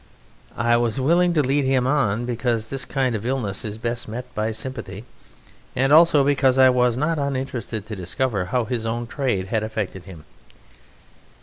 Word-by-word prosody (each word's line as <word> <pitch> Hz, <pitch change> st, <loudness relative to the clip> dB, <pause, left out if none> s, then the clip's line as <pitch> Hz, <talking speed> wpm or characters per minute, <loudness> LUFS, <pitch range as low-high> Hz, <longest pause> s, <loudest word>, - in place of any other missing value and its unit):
I 120 Hz, 0 st, +3 dB
was 120 Hz, +2 st, 0 dB
willing 170 Hz, +6 st, +3 dB
to 150 Hz, -, +3 dB
lead 140 Hz, +2 st, +1 dB
him 130 Hz, -1 st, +2 dB
on, 120 Hz, -5 st, +1 dB
because 120 Hz, -2 st, -1 dB
this 135 Hz, -1 st, -3 dB
kind 130 Hz, -3 st, 0 dB
of 105 Hz, -, -4 dB
illness 120 Hz, -6 st, -2 dB
is 105 Hz, -1 st, -5 dB
best 115 Hz, +1 st, -3 dB
met 120 Hz, +3 st, -5 dB
by 110 Hz, +1 st, -1 dB
sympathy, 110 Hz, -3 st, -5 dB, 0.7 s
and 135 Hz, +3 st, +2 dB
also 155 Hz, -3 st, +6 dB
because 135 Hz, -2 st, +2 dB
I 130 Hz, -1 st, +7 dB
was 125 Hz, -1 st, +2 dB
not 155 Hz, +3 st, 0 dB
uninterested 130 Hz, -6 st, -3 dB
to 105 Hz, 0 st, -6 dB
discover 100 Hz, +2 st, -2 dB
how 120 Hz, +6 st, -1 dB
his 115 Hz, -2 st, -2 dB
own 120 Hz, +1 st, -2 dB
trade 115 Hz, -8 st, -2 dB
had 110 Hz, 0 st, 0 dB
affected 105 Hz, -4 st, -4 dB
him. 85 Hz, -6 st, -12 dB
120 Hz, 175 wpm, -22 LUFS, 110-135 Hz, 0.7 s, I